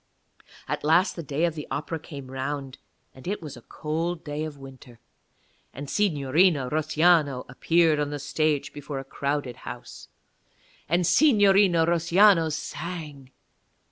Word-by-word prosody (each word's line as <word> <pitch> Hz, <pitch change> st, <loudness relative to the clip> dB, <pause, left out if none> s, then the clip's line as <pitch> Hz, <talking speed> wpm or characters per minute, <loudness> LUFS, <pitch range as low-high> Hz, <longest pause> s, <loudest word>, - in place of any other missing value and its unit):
At -, -, -3 dB
last 165 Hz, +5 st, +3 dB
the 170 Hz, -, -5 dB
day 150 Hz, +2 st, -1 dB
of 170 Hz, -, -1 dB
the 150 Hz, -2 st, -7 dB
Opera 160 Hz, +2 st, -4 dB
came 140 Hz, -4 st, -10 dB
round, 135 Hz, 0 st, -5 dB, 0.3 s
and 130 Hz, +5 st, -13 dB
it 205 Hz, +3 st, -2 dB
was 150 Hz, -4 st, -8 dB
a 120 Hz, -, -13 dB
cold 165 Hz, +6 st, -4 dB
day 150 Hz, +1 st, -4 dB
of 155 Hz, -2 st, -7 dB
the -, -, -18 dB
winter. 130 Hz, -3 st, -13 dB, 0.8 s
And 145 Hz, +1 st, -7 dB
Signorina 150 Hz, -5 st, +2 dB
Russiano 155 Hz, -3 st, +2 dB
appeared 160 Hz, +4 st, +2 dB
on 145 Hz, -1 st, -1 dB
the 145 Hz, -, -4 dB
stage 145 Hz, +1 st, -1 dB
before 145 Hz, -1 st, -6 dB
a 135 Hz, -, -4 dB
crowded 140 Hz, -2 st, -3 dB
house. 120 Hz, -, -10 dB, 0.8 s
And 175 Hz, +2 st, +2 dB
Signorina 200 Hz, -, +4 dB
Russiano 170 Hz, +1 st, +4 dB
sang. 150 Hz, -2 st, -6 dB
150 Hz, 140 wpm, -25 LUFS, 140-170 Hz, 0.8 s, Signorina